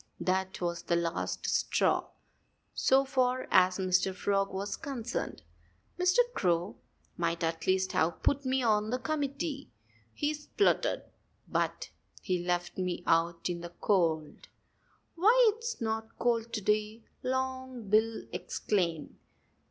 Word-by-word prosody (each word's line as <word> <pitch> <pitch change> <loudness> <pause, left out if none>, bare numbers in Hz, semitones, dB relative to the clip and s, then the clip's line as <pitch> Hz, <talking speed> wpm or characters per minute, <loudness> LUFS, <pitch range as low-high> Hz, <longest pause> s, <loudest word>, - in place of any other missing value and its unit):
That 190 0 -1
was 170 -1 -1
the 170 - 0
last 170 -1 -2
straw, - - +2 0.7
so 270 +1 +3
far 255 -1 +1
as 185 0 +5
Mr. 185 0 +1
Frog 195 +1 0
was 195 +1 -3
concerned. 250 -3 -4 0.6
"Mr. 360 +3 +3 0.2
Crow 175 - 0 0.4
might 170 0 -1
at 165 0 -2
least 190 0 +2
have 160 +1 0
put 285 0 +2
me 260 0 +1
on 215 -2 +2
the 250 - 0
committee," 280 +1 -3 0.4
he 295 - -1
spluttered. 305 +7 +1 0.4
"But - - -1 0.3
he 185 - -1
has 175 - -6
left 175 +1 -1
me 180 -1 -2
out 165 +1 +2
in 175 -1 -3
the 175 0 -8
cold." 165 -6 0 0.7
"Why, 445 +6 +5
it's 470 +1 -5
not 220 0 -3
cold 235 -1 0
to 215 - -1
day!" 215 +2 0 0.2
Long 260 -2 -3
Bill 220 +2 +2
exclaimed. 170 -7 -2
210 Hz, 130 wpm, -30 LUFS, 180-260 Hz, 0.7 s, as